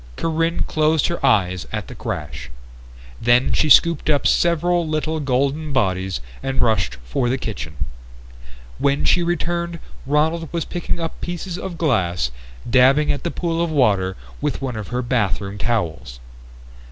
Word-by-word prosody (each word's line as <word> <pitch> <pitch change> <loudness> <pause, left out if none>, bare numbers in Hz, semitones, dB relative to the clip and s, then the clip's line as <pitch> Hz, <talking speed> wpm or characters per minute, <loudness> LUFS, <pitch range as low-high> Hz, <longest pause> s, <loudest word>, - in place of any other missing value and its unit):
Corinne 165 +1 0
closed 155 -1 +2
her 170 - -4
eyes 90 -2 +2
at - - -3
the - - -9
crash. 65 -4 -5 0.7
Then 120 +2 +3
she 155 - +2
scooped 170 0 +5
up 145 -2 +2
several 170 0 +2
little 155 +1 -1
golden 140 +2 0
bodies 95 - 0 0.2
and 135 0 -2
rushed 110 - +2
for 120 - 0
the 130 - +1
kitchen. 90 - -6 1.0
When 140 0 +1
she 180 - +4
returned 170 0 -1 0.3
Ronald 160 +3 +1
was 170 -2 -2
picking 175 0 -3
up 165 -1 -5
pieces 175 +1 -4
of 185 -2 -6
glass 90 - +1 0.3
and - - -8
dabbing 140 +4 +5
at 145 - -4
the 170 - -1
pool 165 -1 -2
of 170 - -1
water 100 -11 +2 0.2
with - - -1
one 130 -3 -3
of 110 -2 -5
her 125 +1 -2
bathroom 100 -4 -1
towels. 85 - -2
140 Hz, 155 wpm, -21 LUFS, 105-165 Hz, 1.0 s, scooped